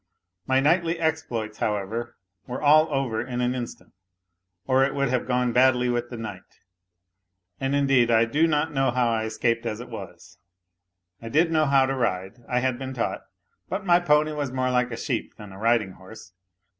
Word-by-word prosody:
My 130 0 +3
knightly 165 +4 +2
exploits, 125 -10 -2
however, 110 +3 -3 0.3
were 125 - -4
all 155 +2 +5
over 130 -6 -1
in 125 0 -5
an 125 0 +1
instant 125 -2 -7 0.7
or 130 +3 +3
it 135 - 0
would 140 -2 0
have 125 -1 -1
gone 125 -1 +1
badly 125 0 +4
with 120 0 -1
the 120 - -7
knight. 115 -1 -9 1.0
And, 135 +1 -1
indeed, 135 -4 +3
I 115 0 +4
do 150 +8 +2
not 150 -2 0
know 135 -1 +2
how 120 -1 +1
I 110 -1 0
escaped 115 +1 -1
as 110 - -3
it 120 - -9
was. - - -10 0.8
I 115 - -7
did 165 +6 +2
know 155 -2 +2
how 135 -1 +4
to 135 - -1
ride, 110 -3 -2
I 125 -1 +1
had 130 -1 -1
been 130 -1 -6
taught. 115 - -2 0.5
But 190 +2 -3
my 175 -1 +5
pony 150 -2 +2
was 145 -3 -3
more 130 0 -1
like 125 -1 +1
a. 115 - -6
sheep 120 -2 -3
than 105 -3 -11
a 95 - -11
riding 115 -3 +2
horse. 95 +1 -14
125 Hz, 190 wpm, -25 LUFS, 115-140 Hz, 1.0 s, all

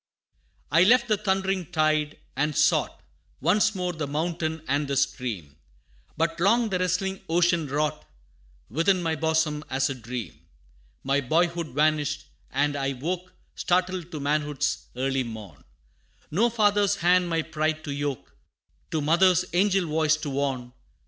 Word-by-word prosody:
XII. 165 - +6
"I - - +8
left 240 +3 +5
the 215 - +4
thundering 190 -3 -1
tide, 155 -1 +1 0.2
and 150 +2 0
sought - - +2 0.4
Once 205 +7 +2
more 180 -1 -2
the 155 -3 -4
mountain 160 +1 -2
and 145 +2 0
the 140 0 -1
stream; 125 - -2 0.6
But 165 0 0
long 225 +6 +3
the 185 -2 -1
wrestling 185 +1 -1
ocean 170 -1 +2
wrought 145 - -1 0.6
Within 175 - +1
my 165 -1 0
bosom: 160 -1 0
as 135 +1 0
a - - -1
dream 120 -1 -7 0.6
My 140 +1 +1
boyhood 170 +4 +1
vanished, 150 +1 0 0.2
and 145 +2 0
I 135 -1 -1
woke 175 +7 -4 0.2
Startled 180 -1 0
to 155 - -5
manhood's 145 0 -1
early 135 +1 0
morn; 110 - -8 0.7
No 215 +10 +3
father's 205 -3 +2
hand 180 +1 +3
my 165 -1 0
pride 155 0 -2
to 145 - -5
yoke, 140 -2 -4 0.6
No 155 - 0
mother's 180 +4 +4
angel 195 0 +3
voice 155 0 +2
to 150 -2 -5
warn. 135 -3 -2
155 Hz, 145 wpm, -26 LUFS, 140-180 Hz, 0.7 s, I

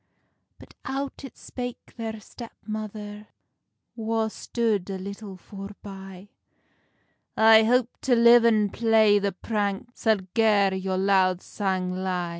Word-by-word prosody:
But - - -16
out 275 +1 -4
it 270 - -10
spake 245 -1 -8
their 225 -2 -5
step 230 +2 -11
mother, 210 -1 -6 0.7
Wha 225 -1 -1
stood 215 -4 -2
a 195 - -3
little 200 +1 -8
foreby: 195 0 -10 1.1
"I 220 0 +7
hope 245 +2 +2
to 255 -3 +2
live 235 0 +7
and 215 -3 +3
play 220 -2 +4
the 200 0 -1
prank 205 +3 -3
Sal 220 -5 +1
gar 210 -4 +3
your 190 0 -2
loud 190 -1 +2
sang 185 -3 -2
ly." 185 -2 -2
210 Hz, 125 wpm, -25 LUFS, 195-225 Hz, 1.1 s, I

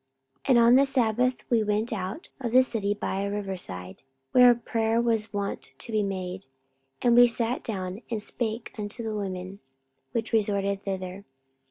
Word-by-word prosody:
44:016:013 - - -6
And 255 - +6
on 240 +1 +7
the 275 - +5
sabbath 250 -1 +1
we 230 -2 +4
went 210 +2 0
out 190 - -5
of 240 -4 -3
the 255 +1 +7
city 205 -5 -1
by 195 -1 -2
a 200 - -1
river 200 -2 -3
side, 90 - -5 0.3
where 245 -1 +7
prayer 225 -1 0
was 225 -2 0
wont 200 -1 -4
to 235 - -5
be 215 -1 +2
made; 190 -1 -4 0.6
and 240 -1 +5
we 245 0 +8
sat 235 +1 -1
down, 190 -1 -4
and 225 -2 -2
spake 220 +2 -3
unto 210 +3 -4
the 220 -1 -3
women 190 -1 -5 0.5
which 230 -1 -3
resorted 200 -2 +1
thither. 190 0 -5
215 Hz, 175 wpm, -27 LUFS, 195-235 Hz, 0.6 s, we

